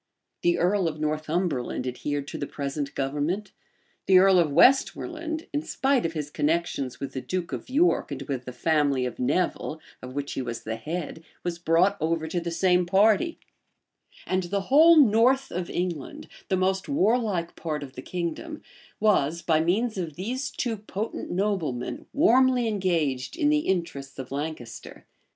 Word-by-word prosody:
The 175 0 +2
earl 185 0 +2
of 155 -1 -4
Northumberland 155 -4 -1
adhered 140 +3 -3
to - - -6
the 145 - -3
present 140 0 -4
government: 150 +9 -2 0.6
the 190 - +7
earl 190 0 +6
of 160 -4 +2
Westmoreland, 315 - +2
in 290 - 0
spite 270 - +1
of 165 - -7
his 150 -2 -4
connections 150 -5 -1
with 140 - -5
the 130 - -4
duke 175 +6 -3
of - - -6
York, 320 +7 +2
and - - -4
with 130 -4 -4
the 125 - -6
family 145 -2 +1
of 125 - -5
Nevil, 160 +3 -1 0.2
of 130 +1 -9
which 145 0 -3
he - - -2
was 120 -2 -5
the 110 +1 -4
head, 160 +4 -5 0.2
was 170 -1 -3
brought 175 +4 +3
over 160 0 0
to 175 +2 -1
the 170 - -3
same 180 +1 +2
party; 215 - +3 0.9
and 185 0 0
the 200 +3 -1
whole 325 +3 +8
north 260 +1 +4
of 180 0 -3
England, 175 -6 -4 0.2
the 190 - +2
most 190 +3 0
warlike 215 -8 +1
part 155 -3 -4
of 135 -2 -10
the - - -8
kingdom, 180 - -5 0.4
was, 170 -6 +2
by 160 -2 +3
means 200 +6 0
of 165 -5 -4
these 255 +8 -3
two 240 -3 -3
potent 210 +1 -5
noblemen, 175 -10 -2
warmly 260 -3 +4
engaged 170 - -1
in 300 -4 +2
the 300 0 +3
interests 165 -7 -2
of 130 -1 -7
Lancaster. 145 -4 -6
175 Hz, 165 wpm, -26 LUFS, 145-210 Hz, 0.9 s, whole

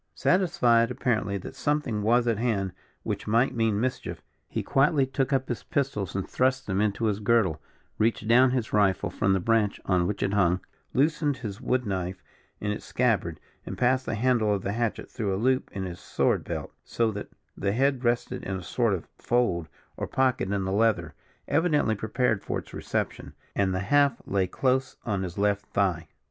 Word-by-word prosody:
Satisfied 120 -11 +3
apparently 120 -6 0
that 95 - -8
something 145 -8 -1
was 120 +3 +3
at 115 -3 +1
hand 105 -6 0 0.3
which - - -4
might 115 +5 +3
mean 115 -4 +1
mischief, 125 +2 -3 0.2
he - - -3
quietly 140 0 +3
took 135 +1 -1
up 135 -1 +1
his 120 - -3
pistols 130 -10 -2
and 95 - -2
thrust 130 +1 +1
them 95 0 0
into 105 +2 0
his 105 -2 +1
girdle, 100 -8 +2 0.4
reached 110 -1 +1
down 125 +3 +6
his 125 -3 -2
rifle 100 -3 +2
from 95 - +1
the 95 - +2
branch 110 +1 +1
on 90 -2 +2
which 105 - -2
it 100 -1 0
hung, 90 -3 +3 0.4
loosened 145 0 +2
his 110 -3 -6
wood 125 0 0
knife 95 -2 -3 0.4
in 105 - -2
its 105 - -4
scabbard, 100 -10 0 0.2
and - - -6
passed 130 +1 +2
the - - -1
handle 115 -2 +2
of 100 -2 0
the 100 - -1
hatchet 115 +1 -2
through 105 -5 -2
a - - -2
loop 130 +4 +1
in 95 - -4
his 90 -1 -6
sword - - 0
belt, - - -5
so 115 -1 0
that 105 0 -6 0.3
the 100 - -1
head 135 +1 +1
rested 120 0 0
in 95 0 -3
a 95 - -7
sort 115 +1 +1
of 85 - -7
fold 115 -9 +1 0.3
or - - -3
pocket 130 -7 +1
in 100 -1 0
the 95 - -2
leather, 100 -6 +1 0.3
evidently 150 -7 +2
prepared 110 0 0
for - - -2
its - - -9
reception, - - -3 0.2
and 95 -1 +2
the 95 0 -1
haft 140 +4 +3
lay 95 -2 +1
close 130 +7 0
on 100 -5 -1
his 90 -2 -5
left 100 0 +1
thigh. 90 -4 0
110 Hz, 190 wpm, -27 LUFS, 100-125 Hz, 0.4 s, down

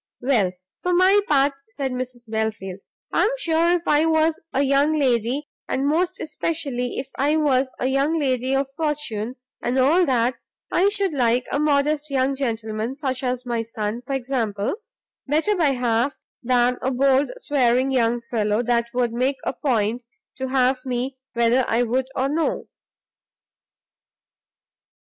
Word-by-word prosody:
"Well, 230 -8 +2 0.3
for 360 0 +1
my 375 +3 +5
part," 280 -1 +3 0.2
said 265 +3 -3
Mrs 250 -1 -6
Belfield, 220 -4 -3 0.3
"I - - +3
am - - +3
sure 335 -6 +1
if 350 0 +1
I 300 +2 +4
was 320 0 +2
a 275 - +1
young 280 +2 +3
lady, 255 +1 +1 0.2
and 270 - 0
most 350 +6 +1
especially 295 -6 -3
if 265 +1 -5
I 295 +3 +3
was 270 -4 +2
a - - -2
young 275 +5 +1
lady 260 -3 0
of 275 +1 +1
fortune, 295 -8 -2 0.3
and 245 +2 -1
all 300 +8 +4
that, 245 -1 +1 0.3
I 385 +3 +4
should 400 -4 +1
like 245 -2 +2
a 285 - 0
modest 300 0 +1
young 270 0 +1
gentleman, 225 -2 -3
such 265 -3 -3
as 250 -1 -2
my 235 -2 -1
son, 225 0 -4
for 260 +2 -5
example, 235 -6 -1 0.5
better 320 +9 +2
by 335 -5 +2
half 245 +1 0 0.2
than 245 0 +2
a 260 - 0
bold 270 +2 +3
swearing 260 - +2
young 240 -2 +1
fellow, 215 -1 0
that 235 -1 +1
would 240 -2 +1
make 260 +3 0
a - - -1
point 240 -4 0 0.4
to 265 0 -3
have 255 0 +1
me 255 +1 -2 0.2
whether 235 +2 +3
I 230 +2 +2
would 250 +2 0
or 265 +1 +1
no." 310 +3 -1
260 Hz, 155 wpm, -23 LUFS, 240-290 Hz, 0.5 s, my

